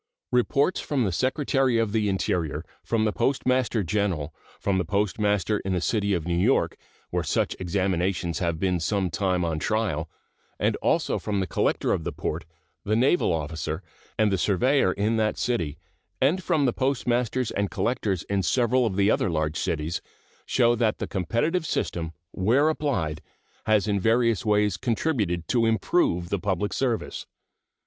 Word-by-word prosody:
Reports 140 +7 +2
from 140 -4 0
the 100 - 0
Secretary 130 - +1
of 115 -2 +1
the 105 -1 +1
Interior, 90 -5 -1 0.2
from 110 -2 +1
the 105 - +2
Postmaster 130 -4 +1
General, 90 -5 -1 0.3
from 95 -2 +1
the - - +1
postmaster 105 +2 0
in 95 - -2
the 90 - +1
city 100 +1 +1
of 85 -3 -3
New 85 0 0
York, 115 +9 +2 0.4
where - - 0
such - - 0
examinations 90 -2 -1
have 85 -2 -1
been 90 -1 +1
some 95 +1 0
time 90 0 0
on 80 -2 -1
trial, 90 -7 -1 0.5
and - - +1
also - - +1
from 105 -2 -2
the 95 - 0
collector 80 - 0
of 80 - -2
the - - -3
port, 80 +2 -4 0.4
the 110 - 0
naval 130 - +3
officer, 80 +2 -3 0.3
and 110 -2 +3
the 95 - +1
surveyor 110 +4 +3
in 105 +4 0
that 110 -1 +1
city, 85 -12 -1 0.4
and 155 +8 +2
from 160 -5 +1
the 125 - +2
postmasters 125 -2 0
and 100 -1 -1
collectors 105 -7 -1
in 100 -1 -1
several 125 +4 +2
of 95 - -3
the 100 +2 +3
other - - +1
large 80 -1 -1
cities, 80 -2 -2 0.5
show 120 -2 +3
that 115 -2 +1
the - - -3
competitive 115 - 0
system, 80 -2 -2 0.2
where 125 +11 +3
applied, 125 - -1 0.5
has 110 -1 +3
in 100 -1 +1
various 115 +1 +2
ways 105 -3 +2
contributed 110 - -1
to 115 -2 +2
improve 110 - +1
the 100 - -1
public 100 +1 -1
service. 125 -4 -2
105 Hz, 165 wpm, -26 LUFS, 90-120 Hz, 0.5 s, naval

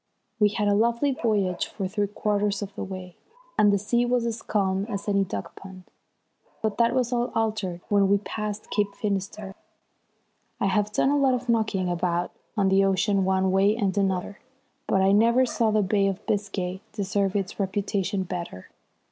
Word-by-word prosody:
We 210 -1 +5
had 210 0 -1
a 205 - +4
lovely 235 +6 +2
voyage 205 -8 0
for 195 - -4
three 205 +1 -1
quarters 205 0 -1
of 200 0 -8
the - - -5
way, 185 -2 -8 0.4
and 205 -1 +5
the 200 - +3
sea 230 +5 +1
was 245 -1 +1
as 230 -1 -3
calm 195 -2 0
as 200 -1 -4
any 200 -1 +2
duck 100 - -6
pond. 190 -1 -11 0.8
But 220 0 -1
that 235 +1 +3
was 250 -1 +1
all 240 0 0
altered 215 -6 -1
when 200 -1 +3
we 200 - +5
passed 210 0 -5
Cape 205 -1 0
Finisterre. 200 -1 -3 1.1
I - - +1
have 205 +2 +1
done 270 - +2
a 290 - +3
lot 270 -2 +3
of 250 0 -6
knocking 215 -5 +1
about 175 0 -1 0.3
on 195 -2 +3
the 195 +1 +4
ocean 195 0 +2
one 190 0 +2
way 195 +3 +3
and 200 -5 0
another, 195 0 -1 0.5
but 190 - +2
I 195 - +4
never 235 +5 +4
saw 230 -2 +1
the 215 -1 +2
Bay 195 +1 +2
of 195 +2 -3
Biscay 195 -2 -2
deserve 200 -1 -1
its 195 0 -2
reputation 195 0 -1
better. 170 - -6
200 Hz, 180 wpm, -25 LUFS, 190-215 Hz, 1.1 s, We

